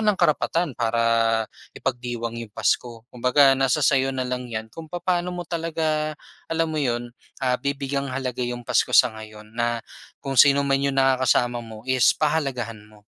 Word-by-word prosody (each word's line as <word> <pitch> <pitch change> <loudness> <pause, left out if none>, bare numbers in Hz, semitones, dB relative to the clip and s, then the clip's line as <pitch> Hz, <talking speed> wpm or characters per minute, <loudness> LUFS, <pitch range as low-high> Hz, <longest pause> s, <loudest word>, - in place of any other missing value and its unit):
ng 210 -2 +2
karapatan 170 +1 +1
para 115 -1 +2 0.3
ipagdiwang 120 -1 -3
'yong 115 -2 -7
pasko. 115 +2 -1
Kumbaga 135 +3 +5
nasa 135 -2 +1
sa'yo 135 -1 +3
na 130 -1 -3
lang 125 -1 -4
'yan 110 -1 -4
kung 160 -1 -9
papaano 175 0 -1
mo 180 -1 -6
talaga, 155 -2 -2 0.3
alam 165 0 +1
mo 155 -2 -2
'yon, 120 -2 -2 0.2
ah, 130 -2 +1
bibigyang 140 0 -2
halaga 130 -1 -3
'yong 120 -1 -4
Pasko - - +2
sa - - +6
ngayon, 110 0 -12
na 120 0 -1 0.4
kung 135 - -3
sino 140 +2 +6
man 135 -1 +2
'yong 140 -1 0
nakakasama 130 -2 +2
mo 110 -1 -11
is 130 -2 +3
pahalagahan 135 -8 -1
mo. 105 -1 -20
130 Hz, 165 wpm, -24 LUFS, 120-145 Hz, 0.4 s, sa